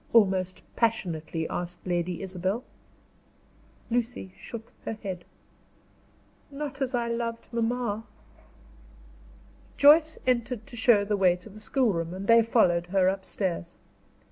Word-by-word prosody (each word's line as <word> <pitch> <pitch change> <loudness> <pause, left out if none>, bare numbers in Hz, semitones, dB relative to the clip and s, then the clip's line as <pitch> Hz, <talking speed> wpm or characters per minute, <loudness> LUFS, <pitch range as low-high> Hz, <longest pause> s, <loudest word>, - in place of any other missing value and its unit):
almost 190 -4 +3
passionately 170 -8 -1
asked 175 0 -5
Lady 175 0 -1
Isabel. 190 +5 -2 1.3
Lucy 235 -5 -2
shook 230 -1 -9
her - - -3
head. 185 -3 -4 1.3
"Not 280 -1 -6
as 260 -1 0
I 235 -1 0
loved 230 0 -3
mamma." 230 -2 -1 1.7
Joyce 310 +2 +6
entered 240 -2 0
to 275 - -9
show 225 -3 +4
the 210 0 +1
way 185 -2 +4
to 180 +4 -13
the 215 +1 -12
schoolroom, 200 -8 0
and 190 +1 -5
they 230 +2 +7
followed 180 -7 +3
her 185 0 +3
upstairs. 190 -2 -2
210 Hz, 115 wpm, -27 LUFS, 185-235 Hz, 1.7 s, they